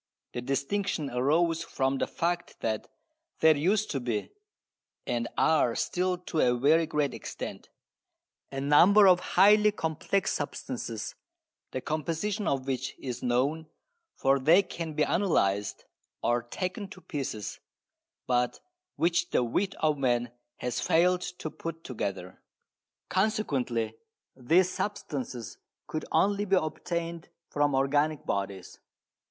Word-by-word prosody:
The 120 - -3
distinction 145 +4 -1
arose 160 +7 +2
from 135 -4 -1
the - - 0
fact 175 +1 -2
that 110 -1 -2 0.5
there 160 -1 +6
used 195 +9 +1
to 135 - -1
be 120 -4 -3 0.7
(and 120 0 -1
are 140 -7 +3
still 180 0 0
to 175 -2 -4
a 125 -1 +3
very 155 +6 +4
great 150 -4 0
extent) - - -7 0.8
a 135 - -4
number 175 +9 +6
of 180 -1 +6
highly 210 +4 +5
complex 185 +2 -1
substances - - -4 0.6
the 130 - -4
composition 165 - -2
of 135 -2 0
which 135 -1 -3
is 125 -2 -5
known, 135 +6 0 0.5
for 135 +1 +2
they 165 +9 +5
can 165 -4 -5
be 150 - +2
analysed, 105 - +1 0.4
or 120 0 +2
taken 185 - -4
to 185 -1 -12
pieces, 130 - -5 0.7
but 125 -1 +1 0.4
which 170 +1 +1
the - - +2
wit 190 +12 -1
of 155 -2 +2
man 120 -2 +1 0.3
has 125 -1 -2
failed 180 +2 +3
to 180 -3 -5
put 165 0 -7
together. 100 -6 -5 0.7
Consequently 135 - 0 0.4
these 170 +9 +3
substances 135 - -4 0.3
could 155 - -4
only 205 +1 +2
be 195 -1 +3
obtained 170 0 -3 0.2
from 145 -1 +2
organic 145 +3 +1
bodies. 100 -1 -3
150 Hz, 125 wpm, -29 LUFS, 125-180 Hz, 0.8 s, there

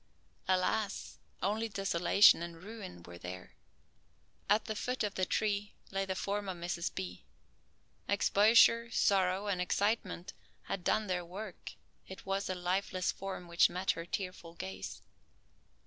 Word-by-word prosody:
Alas, 190 +3 0 0.2
only 220 +3 0
desolation 195 -2 +5
and 170 0 -7
ruin 200 - -8
were 85 0 -11
there. 90 +1 -8 1.0
At 210 +2 +4
the 220 - -3
foot 250 +3 -2
of 205 -1 -1
the 185 -1 0
tree 205 -1 0 0.2
lay 195 0 0
the 190 -1 -2
form 200 +1 -2
of 185 - -4
Mrs. 170 0 -2
B. 185 -1 -5 0.8
Exposure, 225 +4 +5
sorrow, 195 -3 +2
and 195 -3 0
excitement 205 0 0 0.3
had 190 - -4
done 215 +4 +2
their 180 -2 -1
work. 190 +3 -8 0.3
It 190 - -10
was 195 0 -1
a 185 - -1
lifeless 185 +1 0
form 190 -2 -6
which 170 0 +5
met 185 +2 0
her 165 +1 -6
tearful 180 -3 -5
gaze. 95 - -6
190 Hz, 140 wpm, -33 LUFS, 175-205 Hz, 1.0 s, desolation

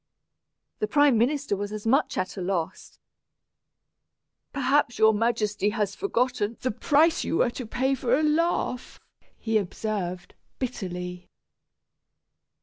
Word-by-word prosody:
The 215 - 0
prime 290 +2 +4
minister 280 -1 +1
was 205 +1 -4
as 215 0 -6
much 265 +6 +2
at 185 0 -2
a 195 - -5
loss. 175 -3 -3 1.5
"Perhaps 275 -2 +1
your 220 0 +5
Majesty 210 -2 0
has 210 -2 -2
forgotten 245 - -1
the 255 - 0
price 305 +9 +3
you 330 - -1
were 240 - +2
to 245 -1 -7
pay 260 +4 0
for 250 -1 +1
a 310 - 0
laugh," 305 -4 0 0.4
he 225 -1 +1
observed, 185 -2 -4 0.2
bitterly. 180 -7 -5
225 Hz, 125 wpm, -26 LUFS, 205-265 Hz, 1.5 s, your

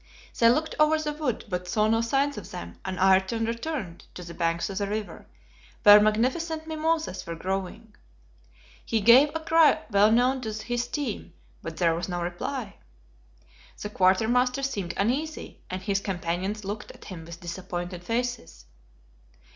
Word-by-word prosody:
They 230 - +7
looked 310 +6 +1
over 305 +1 +5
the 305 -1 -3
wood, 295 -6 -3
but 180 -2 -4
saw 210 +4 +2
no 225 +1 +2
signs 275 +5 +1
of 210 -5 -8
them, 85 0 -8
and 190 -1 -4
Ayrton 190 +4 +3
returned 230 - -4
to 180 - -7
the 170 0 -9
banks 170 0 -1
of 195 - -3
the 200 - -1
river, 210 0 -5 0.6
where 210 -1 +9
magnificent 265 +10 0
mimosas 320 - -1
were 170 - -4
growing. 195 +5 -4 0.9
He 225 - 0
gave 240 +8 +7
a - - 0
cry 320 -4 +4
well 205 +2 +5
known 250 +3 +3
to 220 -3 -4
his 240 +3 -3
team, 240 - -4 0.3
but 165 -1 -7
there 170 -2 +3
was 170 +3 -4
no 175 -1 -2
reply. 200 +6 -4 1.0
The 210 - -5
quartermaster 235 +8 +2
seemed 200 -10 -3
uneasy, 280 +9 -2
and 185 +1 -5
his 195 -1 0
companions 190 +2 -3
looked 210 +2 -5
at - - -13
him 180 -5 -8
with 170 0 -10
disappointed 175 0 -6
faces. 235 - -3
215 Hz, 160 wpm, -26 LUFS, 185-255 Hz, 1.0 s, where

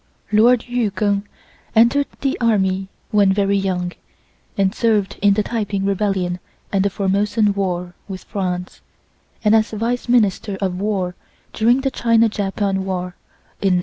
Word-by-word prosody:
Lord 230 +3 +4
Yu 245 -3 0
Keng 200 +1 -1 0.5
entered 235 +6 +4
the 275 -1 0
army 195 -4 +1 0.2
when 205 -2 +4
very 200 0 +2
young, 185 -2 -1 0.7
and 195 -1 +2
served 220 -5 0
in 200 0 +4
the 210 - +1
Taiping 205 -4 -2
rebellion 195 -3 0 0.3
and 195 -1 +2
the 200 - +2
Formosan 200 +2 +1
war 180 -3 -2
with 190 -2 -7
France, 180 -2 -4 0.6
and 210 +1 +5
as 220 0 +3
Vice 235 +3 -2
Minister 210 -4 +2
of 185 -2 -2
War 195 -3 -1 0.4
during 240 +4 +3
the 270 0 -1
China 230 -2 +3
Japan 195 -1 -1
war 180 -1 -3 0.5
in 190 -2 +3
1895. - - +2
200 Hz, 150 wpm, -20 LUFS, 190-220 Hz, 0.7 s, and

